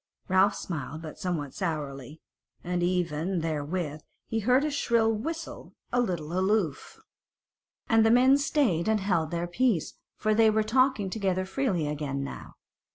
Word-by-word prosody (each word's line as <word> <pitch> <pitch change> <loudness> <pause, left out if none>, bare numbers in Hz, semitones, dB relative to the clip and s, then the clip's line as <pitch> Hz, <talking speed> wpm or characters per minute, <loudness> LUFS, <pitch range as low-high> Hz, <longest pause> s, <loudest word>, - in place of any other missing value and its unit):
Ralph 190 +2 +4
smiled, 160 -1 -5
but 155 - -9
somewhat 160 -7 -3
sourly, 150 -5 -4 0.4
and 180 0 -1
even 175 0 0
therewith 155 0 -3 0.2
he 225 - -2
heard 250 +5 +3
a 305 - -1
shrill 230 -5 +2
whistle 320 +10 -6 0.2
a 245 - +3
little 170 -8 -3
aloof, 190 -6 -1 0.9
and 225 -1 +4
the 225 - +4
men 260 +4 +5
stayed 275 - +1
and 220 -1 +2
held 175 -5 0
their 170 +1 -2
peace, 185 0 0 0.2
for 215 - +1
they 220 0 +5
were 215 0 +2
talking 235 -3 +2
together 190 -3 -1
freely 190 - -1
again 145 -2 -3
now. 140 - -8
185 Hz, 150 wpm, -28 LUFS, 160-225 Hz, 0.9 s, men